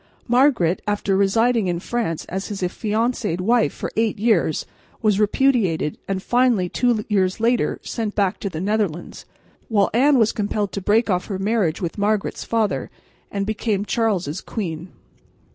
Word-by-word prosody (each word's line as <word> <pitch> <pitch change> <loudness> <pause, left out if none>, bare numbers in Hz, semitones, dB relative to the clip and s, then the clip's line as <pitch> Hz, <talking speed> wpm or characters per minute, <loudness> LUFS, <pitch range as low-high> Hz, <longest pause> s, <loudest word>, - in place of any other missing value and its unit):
Margaret, 245 - +3
after 205 -1 0
residing 225 +2 +2
in 175 -1 -1
France 200 -5 -3
as 190 +2 -4
his 200 -3 -5
affianced 215 0 -1
wife 230 +5 +2
for - - -6
eight 225 -1 +1
years, 205 -8 +1 0.4
was 210 -2 +3
repudiated 210 - +1
and 195 -1 -2
finally, 240 -7 +2
two 235 -1 +1
years 190 -1 +1
later, 235 +1 +1
sent 220 -3 -4
back 195 -3 +1
to 200 - -3
the 160 -4 -6
Netherlands, 195 -4 -2 0.4
while 205 -4 +2
Anne 270 +4 +4
was 225 -2 +3
compelled 205 -1 -2
to 200 - -4
break 215 +3 +2
off 180 0 -1
her 195 - -3
marriage 195 -4 0
with 170 +4 -4
Margaret's 210 0 0
father, 225 -2 -1 0.4
and 200 -1 -2
became 210 -1 -1
Charles' 195 -9 -1
queen. 175 -5 -5
205 Hz, 155 wpm, -22 LUFS, 190-230 Hz, 0.4 s, Anne